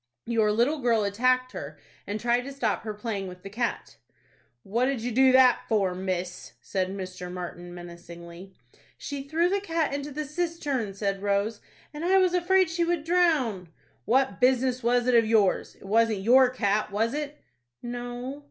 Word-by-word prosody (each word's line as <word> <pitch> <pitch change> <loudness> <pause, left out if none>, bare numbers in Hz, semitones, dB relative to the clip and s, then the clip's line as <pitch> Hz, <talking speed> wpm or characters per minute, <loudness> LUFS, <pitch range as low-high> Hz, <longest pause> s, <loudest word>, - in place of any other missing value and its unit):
"Your 225 -2 +2
little 245 +8 +1
girl 235 -4 +2
attacked 255 +5 +1
her, 150 - -7 0.3
and 205 +2 -3
tried 240 +1 +1
to 275 - -6
stop 245 -6 -1
her 215 -1 -5
playing 205 -3 -4
with 180 0 -11
the 195 - -8
cat." 235 +2 -3 0.7
"What 235 +6 0
did 265 -3 -1
you 245 +2 -3
do 260 +3 +5
that 260 -1 +6
for, 200 -5 +1
miss?" 180 -1 -4
said 190 -2 -2
Mr. 185 -2 -6
Martin, 175 -1 -7
menacingly. 175 +1 -11 0.4
"She 285 -1 -5
threw 315 +5 +1
the 395 +2 0
cat 330 -6 -1
into 285 +1 -4
the 300 +2 -4
cistern," 295 - -3
said 195 -1 -2
Rose; 205 +2 0 0.3
"and 300 +2 -6
I 375 +2 +4
was 370 -2 +3
afraid 370 +1 +3
she 340 +1 0
would 340 -2 0
drown." 305 - +1 0.4
"What 265 +3 +1
business 255 0 +2
was 240 0 +2
it 250 - +2
of 230 -2 +5
yours? 215 -4 +2
It - - -17
wasn't 220 0 +2
your 250 +5 +6
cat, 210 -4 0
was 225 +4 0
it?" 295 0 -4 0.5
"No." 245 +3 -5
235 Hz, 175 wpm, -27 LUFS, 200-275 Hz, 0.7 s, that